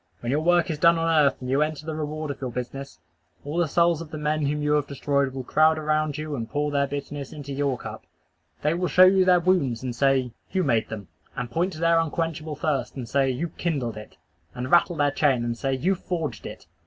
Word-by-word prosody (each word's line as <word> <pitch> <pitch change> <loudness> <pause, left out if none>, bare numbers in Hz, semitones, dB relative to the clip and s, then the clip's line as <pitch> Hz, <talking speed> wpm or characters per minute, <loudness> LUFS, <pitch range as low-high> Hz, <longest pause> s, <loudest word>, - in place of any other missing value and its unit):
When 120 - -2
your 145 +3 +1
work 175 +1 +3
is 150 - -4
done 170 +1 +5
on 165 0 0
earth, 150 -4 +3
and 125 - -5
you 140 +2 +2
enter 155 0 -2
the 160 - -3
reward 155 0 -4
of 140 - -9
your 130 - -2
business, 125 +3 -6 0.5
all 150 +3 -4
the 175 - +2
souls 170 +1 +2
of 165 - -8
the 155 - -6
men 150 -1 0
whom 150 +1 -1
you 150 - +1
have 145 -1 +1
destroyed 140 -1 0
will 130 0 -5
crowd 155 +4 +3
around 155 -1 0
you 155 -1 -4
and 115 -3 -5
pour 145 +3 -1
their 140 -1 +1
bitterness 140 0 -6
into 145 -2 -7
your 140 -2 0
cup. - - -8 0.6
They 150 +2 +2
will 180 +1 -1
show 185 - +6
you 190 0 +5
their 180 -1 +5
wounds 160 -10 +1
and 125 -2 -3
say, 130 -1 +2 0.2
"You 190 -1 +1
made 115 -7 +1
them;" 100 -6 -7 0.3
and 120 - -4
point 175 +7 0
to 155 - -8
their 165 0 +4
unquenchable 160 -1 -2
thirst, 140 -4 -2
and 125 -4 -6
say, 135 +3 +2
"You 140 +7 -2
kindled 140 -11 -2
it;" 105 0 -11 0.4
and 125 +1 -4
rattle 175 0 +4
their 145 -2 +2
chain 135 -5 +2
and 120 0 -2
say, 135 +3 -1
"You 175 +9 +1
forged 170 -4 -4
it." - - -10
150 Hz, 240 wpm, -25 LUFS, 135-165 Hz, 0.6 s, show